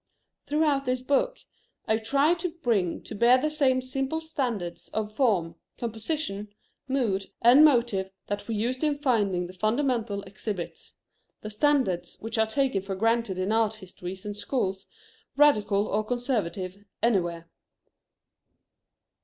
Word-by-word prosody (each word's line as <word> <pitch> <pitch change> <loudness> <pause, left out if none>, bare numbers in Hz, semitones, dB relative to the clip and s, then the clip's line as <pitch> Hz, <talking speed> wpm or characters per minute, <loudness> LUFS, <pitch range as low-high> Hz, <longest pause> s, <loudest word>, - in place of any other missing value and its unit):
Throughout 295 -2 +2
this 255 0 -1
book - - +1 0.5
I 220 - +3
try 275 +8 +3
to 350 +1 -2
bring 200 -9 +1
to - - -8
bear 235 +4 +5
the 305 +4 -1
same 260 -4 +2
simple 270 +4 -2
standards 245 - -3
of 215 -1 -2
form, 205 -10 +1 0.2
composition, 225 -2 -3 0.4
mood, 225 -8 0 0.2
and 250 +6 +8
motive 235 -10 +3 0.2
that 205 0 -4
we 225 - -2
used 245 +6 -1
in 295 -2 +1
finding 205 -10 +1
the 180 - -9
fundamental 220 0 0
exhibits; 195 -2 -6 0.5
the 215 - -6
standards 210 -8 +1
which 225 +1 -4
are 220 - +4
taken 255 -4 0
for 195 0 -4
granted 225 -1 +1
in 185 +2 -1
art 220 -1 +2
histories 185 -2 -9
and 205 0 -4
schools, 195 -3 -2 0.5
radical 210 -8 +4
or 215 0 0
conservative, 205 -6 -2 0.2
anywhere. 175 -7 +1
225 Hz, 135 wpm, -27 LUFS, 195-265 Hz, 0.5 s, and